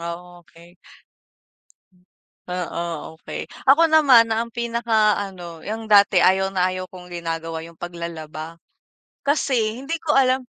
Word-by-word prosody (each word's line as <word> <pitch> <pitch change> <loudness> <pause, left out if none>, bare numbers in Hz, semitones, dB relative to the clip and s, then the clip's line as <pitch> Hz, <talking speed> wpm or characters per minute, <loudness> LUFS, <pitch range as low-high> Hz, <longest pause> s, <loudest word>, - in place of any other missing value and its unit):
oh, 175 +1 -7
okey. 170 +1 -19 1.7
Oo, 170 -2 -5
okey. - - -6 0.2
Ako 320 +3 +6
naman, 255 -7 +6
ang 230 +1 -1
pinaka 230 -3 +1
ano, 175 -5 -8
'yung 220 +4 -5
dati 200 -3 +5
ayaw 190 +1 +3
na 185 -1 0
ayaw 185 0 -5
kong 180 -1 -13
ginagawa 165 -1 -4
'yung 165 0 -12
paglalaba. 165 -2 -7 0.7
Kasi, 255 -5 0
hindi 305 +5 -3
ko 320 -2 -2
alam 260 -1 +3
185 Hz, 125 wpm, -22 LUFS, 170-235 Hz, 1.7 s, Ako